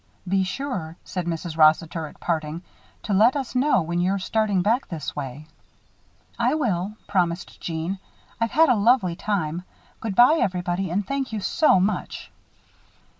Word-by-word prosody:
"Be 190 +1 +2
sure," 185 - -4
said 180 -2 -4
Mrs. 165 -1 -3
Rossiter, 160 +1 +3
at - - -15
parting, 160 0 -2 0.4
"to 210 - -2
let 220 +7 +5
us 270 -4 -3
know 255 - +3
when 170 +2 -1
you're 190 +2 +1
starting 200 -1 0
back 230 +6 +1
this 155 -4 -5
way." 140 +1 -6 0.9
"I - - +2
will," 210 - -1
promised 175 -3 -1
Jeanne. 170 +3 -3 0.4
"I've 230 0 +1
had 320 +5 +4
a 250 - +5
lovely 210 -4 +3
time. 175 -5 -2 0.4
Good 215 -4 -4
by, 255 +9 +6
everybody, 180 0 -1
and 195 +4 -1
thank 275 0 -2
you 220 - -2
so 255 - +3
much." 200 +4 -2
190 Hz, 155 wpm, -24 LUFS, 170-225 Hz, 0.9 s, by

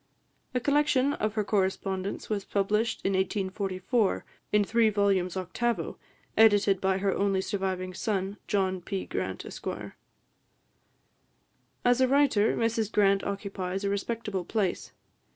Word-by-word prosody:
A - - +3
collection 285 0 +2
of 215 -4 -2
her 215 - +1
correspondence 190 -1 -1
was 205 -2 -2
published 210 +4 0
in 195 - +2
1844, 190 +2 0 0.3
in 210 0 +4
three 225 +2 +3
volumes 195 -3 +1
octavo, 230 +6 -2 0.4
edited 205 -3 +5
by 190 0 +2
her 195 0 +1
only 195 -1 +1
surviving 190 -2 -2
son, 195 +1 -2
John 190 -2 0
P. 190 +2 -4
Grant, - - -4
Esq. - - -8 2.2
As 245 +1 +4
a 260 - +5
writer, 265 -6 +3
Mrs 225 -2 0
Grant 200 -1 +3
occupies 195 -1 -3
a 200 - 0
respectable 200 -2 -2
place. 195 -1 -2
200 Hz, 125 wpm, -28 LUFS, 190-220 Hz, 2.2 s, edited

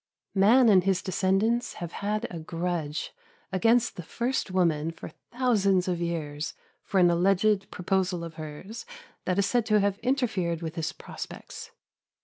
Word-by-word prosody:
Man 225 +6 +6
and 190 -4 +6
his 190 -1 +1
descendants 195 +6 +1
have 170 -1 -6
had 210 +3 -2
a 170 - -5
grudge 165 -2 -3 0.4
against 225 +4 +3
the - - -4
first 240 +8 -2
woman 165 -4 +1
for 165 - -8 0.2
thousands 200 -7 +2
of 175 -2 -1
years, 155 -3 -3 0.3
for 195 - 0
an 175 -1 +6
alleged 195 +3 +2
proposal 180 -1 -1
of 165 -1 -7
hers 160 - -8 0.4
that 180 0 0
is 200 - +3
said 240 +3 +2
to 215 -1 +4
have 200 0 +1
interfered 210 - 0
with 160 -1 -4
his 165 -2 -2
prospects. - - -9
185 Hz, 150 wpm, -27 LUFS, 170-215 Hz, 0.4 s, Man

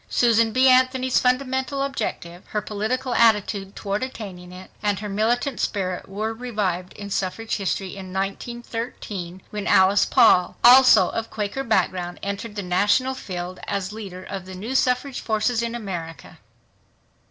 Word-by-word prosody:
Susan 230 -2 +3
B. 255 +3 +4
Anthony's 255 0 +4
fundamental 260 +2 0
objective, 180 -10 -4
her 210 - -2
political 240 +5 -2
attitude 205 -3 +2
toward 200 +1 -3
attaining 195 -9 -7
it, 185 +1 -12
and 205 -2 0
her 210 - -5
militant 230 +7 0
spirit 185 -3 -2
were 215 +3 -3
revived 205 -7 -3
in 205 -1 -9
suffrage 200 +4 -2
history 195 -1 -2
in 190 -2 -8
1913 195 -2 -5
when 210 -1 -4
Alice 190 +1 +5
Paul, 180 - +4
also 245 -6 +8
of 225 0 -4
Quaker 215 +5 -3
background, 185 -7 0
entered 200 +2 -4
the 205 - -3
national 205 +9 +2
field 180 -7 -6
as 200 0 -3
leader 195 -4 -8
of 190 -2 -7
the 185 - -8
new 215 +8 -5
suffrage 255 0 +1
forces 225 +2 0
in 235 0 -3
America. 175 -7 -7
210 Hz, 145 wpm, -23 LUFS, 190-245 Hz, -, also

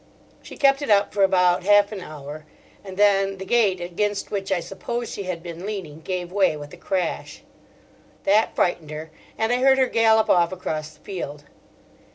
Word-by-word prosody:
She - - -12
kept 275 0 +4
it 285 - -4
up 205 -1 +3
for 205 - 0
about 180 -2 +4
half 205 +1 +5
an 205 -3 -6
hour, 150 -1 -9 0.4
and 190 -2 -9
then 195 -1 +3
the 190 - -7
gate 205 -4 +2
against 195 +4 -2
which, 195 -1 -3
I 190 - +2
suppose, 235 +6 -5
she 200 - -5
had 175 -2 -4
been 170 0 -8
leaning, 190 -7 -6
gave 180 +1 -4
way 190 -5 +2
with 145 0 -10
a - - -10
crash. 185 -4 -3 0.8
That 210 +3 +2
frightened 175 -4 0
her, 155 +1 -7 0.3
and 220 +1 0
I - - +2
heard 265 +1 +4
her 260 - +4
gallop 220 -2 +3
off 170 -1 +3
across 155 -4 -4
the 150 - -27
field. 150 -6 -6
190 Hz, 190 wpm, -23 LUFS, 170-205 Hz, 0.8 s, half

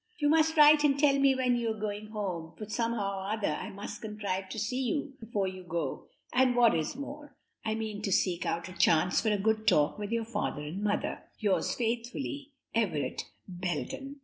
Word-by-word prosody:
"You 295 -1 +2
must 320 +1 +3
write 300 0 +8
and 280 -2 +4
tell 280 -1 +4
me 275 -1 +5
when 250 -1 +2
you 235 -1 0
are 220 -1 -3
going 210 0 -3
home, 185 -7 -4
for 215 - -6
somehow 215 -3 -1
or 190 +1 -5
other 210 - 0
I - - -5
must 200 +1 -7
contrive 200 -3 -3
to - - -6
see 235 +5 -1
you 275 +2 -1
before 210 -4 -1
you 185 0 -6
go, 170 -1 -3 0.3
and 255 -1 +4
what 240 -2 +6
is 160 +7 -1
more, 285 +2 -8 0.3
I 220 -1 -1
mean 215 -2 -4
to 205 - -2
seek 180 -1 +2
out 170 +1 -2
a 185 - -9
chance 170 0 +3
for 220 - +1
a 210 - +2
good 220 +2 0
talk 150 +7 +3
with 205 +1 -4
your 230 -1 0
father 190 -9 -3
and 160 +7 -5
mother. 205 -1 -1 0.2
"'Yours 205 -3 +1
faithfully, 245 +5 -3 0.2
"'Everett 165 - 0 0.2
Belden.'" 180 - -4
215 Hz, 200 wpm, -30 LUFS, 190-255 Hz, 0.3 s, write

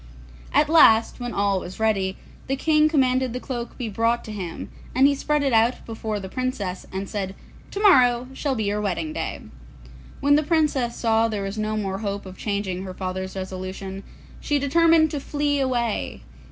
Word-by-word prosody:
At 300 - +4
last, 230 -9 +5
when 245 -1 -4
all 200 -2 +1
was 180 +2 -9
ready, 195 -4 +1 0.3
the 270 - 0
King 305 +2 +3
commanded 260 -4 +2
the 250 - -3
cloak 240 -3 -5
to - - -23
be 245 - -3
brought 230 +3 0
to 215 - -7
him, 185 -5 -6 0.3
and 265 +2 +5
he 285 - +5
spread 295 +1 0
it 270 -3 +1
out 230 +2 +2
before 220 -2 -4
the 190 - -6
Princess, 205 -5 -3
and 190 +1 -4
said, 195 -2 -4 0.3
'Tomorrow 255 - +4
shall 270 0 -1
be 220 - -1
your 205 +1 -1
wedding 210 - -2
day.' - - -4 0.8
When 285 +1 +3
the - - +3
Princess 295 -7 +1
saw 225 -1 +2
that - - -5
there 200 - -2
was 195 +2 -4
no 215 0 -1
more 195 -2 -2
hope 200 -2 -4
of 185 0 -9
changing 200 -3 -3
her 185 -1 -7
father's 190 0 -4
resolution, 190 +1 -6 0.4
she 295 - 0
determined 315 +2 +4
to 290 - -2
flee 290 0 -1
away. 235 - -1
230 Hz, 190 wpm, -24 LUFS, 195-275 Hz, 0.8 s, last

